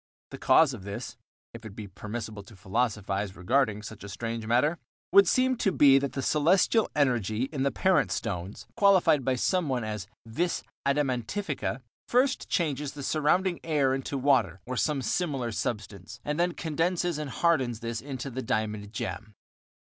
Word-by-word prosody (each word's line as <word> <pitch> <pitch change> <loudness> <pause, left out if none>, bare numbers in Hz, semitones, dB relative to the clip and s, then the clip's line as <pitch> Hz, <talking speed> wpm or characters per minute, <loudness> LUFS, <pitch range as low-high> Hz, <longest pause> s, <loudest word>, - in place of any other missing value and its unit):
The - - -8
cause 155 -4 +5
of 110 -6 -8
this 100 0 -6 0.4
(if 115 0 -10
it 110 -3 -9
be 105 -2 -7
permissible 105 +2 -6
to 110 - -14
philosophize 100 -1 -2
regarding 105 +2 +1
such 110 -1 -9
a 100 - -8
strange 115 +2 -4
matter) 145 +8 +2 0.3
would 200 -2 +7
seem 255 +5 +3
to 195 - +1
be 140 -5 +6
that 140 -1 -3
the 135 - -3
celestial 180 - +3
energy 120 -6 +1
in 140 - -2
the 140 - +3
parent 150 - +2
stones, 90 +2 -4
qualified 185 - +4
by 130 +1 +1
some 175 +5 0
one 125 -3 -1
as 105 -3 -4 0.2
"vis 165 +10 -1 0.2
adamantifica," 140 - -1 0.2
first 260 +2 +1
changes 150 -6 -1
the 145 - -7
surrounding 170 +5 +1
air 145 -5 +2
into 135 +1 -3
water, 125 - +2
or 125 - -4
some 140 +1 0
similar 135 -10 -1
substance, 105 -2 -5
and 150 +2 -2
then 175 0 +2
condenses 165 +1 -1
and 150 -2 -4
hardens 130 -7 +1
this 115 -1 -4
into 135 -1 -6
the 130 +2 -4
diamond 110 -3 -2
gem. 105 0 -5
130 Hz, 165 wpm, -28 LUFS, 110-155 Hz, 0.4 s, would